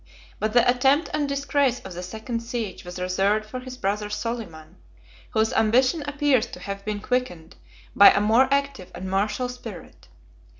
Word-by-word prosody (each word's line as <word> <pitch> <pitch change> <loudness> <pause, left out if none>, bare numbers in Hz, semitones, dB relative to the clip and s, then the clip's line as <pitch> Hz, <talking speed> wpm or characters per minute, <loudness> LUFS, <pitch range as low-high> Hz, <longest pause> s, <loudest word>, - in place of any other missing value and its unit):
But 215 0 -1
the 240 -1 +5
attempt 265 +5 +3
and 290 -2 0
disgrace 280 -2 +1
of 190 - -9
the 175 - -6
second 220 +6 -5
siege 230 -4 -5
was 180 0 -8
reserved 195 +4 0
for 255 +4 -6
his 255 0 -9
brother 205 -1 -2
Soliman, 205 -9 -6 0.5
whose 220 0 +1
ambition 255 +8 +3
appears 285 -4 +2
to - - -10
have 200 0 -6
been 210 0 -3
quickened 190 -10 -3 0.4
by 200 - +10
a - - +3
more 230 +6 +3
active 280 -9 -1
and 190 - -6
martial 205 +6 0
spirit. 250 0 -10
225 Hz, 165 wpm, -24 LUFS, 200-255 Hz, 0.5 s, by